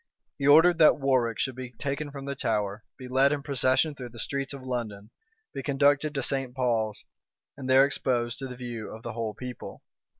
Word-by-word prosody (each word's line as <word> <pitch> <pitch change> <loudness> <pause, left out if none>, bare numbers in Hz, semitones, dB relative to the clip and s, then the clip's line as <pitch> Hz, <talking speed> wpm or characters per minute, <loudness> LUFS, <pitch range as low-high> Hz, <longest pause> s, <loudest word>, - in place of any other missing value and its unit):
He 140 - 0
ordered 165 +4 +6
that 155 - +7
Warwick 130 -5 +1
should 130 - -1
be 125 0 -8
taken 140 +5 -4
from 140 -1 -8
the 140 - -3
Tower, 105 -4 -2
be 130 - -9
led 135 +2 +3
in 145 -1 -2
procession 135 +1 +2
through 125 -3 -8
the 115 - -14
streets 135 +3 -3
of 140 -2 -8
London, 110 -5 -5 0.4
be - - -4
conducted 145 +1 +2
to 135 - -1
St. 135 -2 0
Paul's, 115 -5 -1 0.5
and 130 -2 -7
there 135 +1 +7
exposed 120 -4 -1
to 135 - -5
the 125 - -8
view 120 -3 -6
of 110 +1 -10
the 120 - -5
whole 110 -2 -4
people. 125 +1 -8
130 Hz, 200 wpm, -27 LUFS, 120-140 Hz, 0.5 s, that